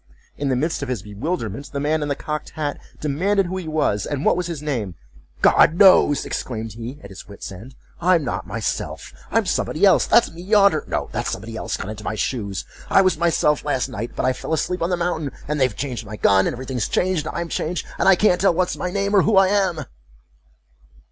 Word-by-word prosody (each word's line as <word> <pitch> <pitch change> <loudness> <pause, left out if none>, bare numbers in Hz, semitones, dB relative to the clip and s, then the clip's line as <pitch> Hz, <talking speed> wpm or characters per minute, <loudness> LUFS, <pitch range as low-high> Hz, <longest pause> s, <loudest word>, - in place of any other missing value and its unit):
In 140 -1 -2
the 130 - +2
midst 155 +6 -1
of 145 - -4
his 120 -7 -3
bewilderment, 115 - -4
the 140 - -3
man 150 +2 0
in 150 - -2
the 140 - -1
cocked 150 +1 -5
hat 145 -2 -2 0.2
demanded 185 +7 +1
who 185 +2 -4
he 180 -3 -5
was, 155 -10 0
and 145 -1 -3
what - - +4
was 180 -1 -2
his 170 -4 -4
name?"God 80 - +1
knows," 180 -7 +6
exclaimed 110 -3 -4
he, 120 +5 -7
at 100 - -11
his 95 - -11
wit's 100 -1 -9
end; 110 +8 -11 0.3
"I'm 175 -2 +3
not - - -4
myself—I'm - - -3
somebody - - +1
else—that's - - +4
me 165 +1 -10
yonder—no—that's 200 -4 +1
somebody 110 +3 -6
else - - -3
got 95 - -6
into 110 0 -8
my 110 - -3
shoes—I 105 - -1
was 185 -4 +1
myself 160 -3 +2
last 135 -4 -1
night, 115 +3 -5
but - - -1
I 130 - +3
fell 160 - -5
asleep 180 +4 -1
on 170 - 0
the 180 - 0
mountain, 160 -5 -2 0.2
and 150 -1 -1
they've 130 -4 +2
changed 125 -5 -4
my 110 0 -8
gun, 95 -2 +3
and - - -2
every 130 +2 -7
thing's 125 -4 -2
changed, 180 -4 0
and - - -4
I'm 170 - -2
changed, 170 +1 -3
and - - +4
I 195 - +7
can't 180 -2 +3
tell 195 -3 +4
what's 185 +1 0
my 180 - -3
name, 200 +2 0
or 195 - +7
who 215 +2 +2
I 190 -1 +6
am!" 190 -7 +1
150 Hz, 215 wpm, -22 LUFS, 115-175 Hz, 0.3 s, I